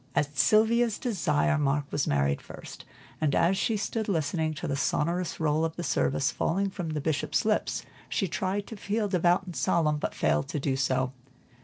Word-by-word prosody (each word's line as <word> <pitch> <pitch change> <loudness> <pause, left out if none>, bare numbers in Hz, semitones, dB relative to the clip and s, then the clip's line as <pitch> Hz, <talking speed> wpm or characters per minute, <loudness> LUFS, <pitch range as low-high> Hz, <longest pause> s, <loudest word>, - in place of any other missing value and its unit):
At 145 0 0
Sylvia's 225 +3 +3
desire, 165 - +1
Mark 145 0 +1
was 145 - 0
married 70 0 +1
first, - - -11 0.4
and 150 -3 +2
as 180 +3 +3
she 220 +3 0
stood 215 +1 -2
listening 160 -2 0
to - - -4
the 140 - -1
sonorous 170 +5 -1
roll 155 0 +1
of 165 0 -1
the 175 - -4
service 135 -3 +1
falling 195 +3 0
from 175 -4 -4
the 155 -1 -2
Bishop's 155 +5 0
lips, 215 -1 0 0.3
she 195 - 0
tried 190 +3 -2
to 225 - -8
feel 210 +1 -1
devout 180 -1 +2
and 180 -3 -8
solemn, 155 -3 +2
but - - -3
failed 75 0 +1
to 150 - -3
do 135 -1 0
so. 130 -1 0
165 Hz, 185 wpm, -28 LUFS, 145-195 Hz, 0.4 s, Sylvia's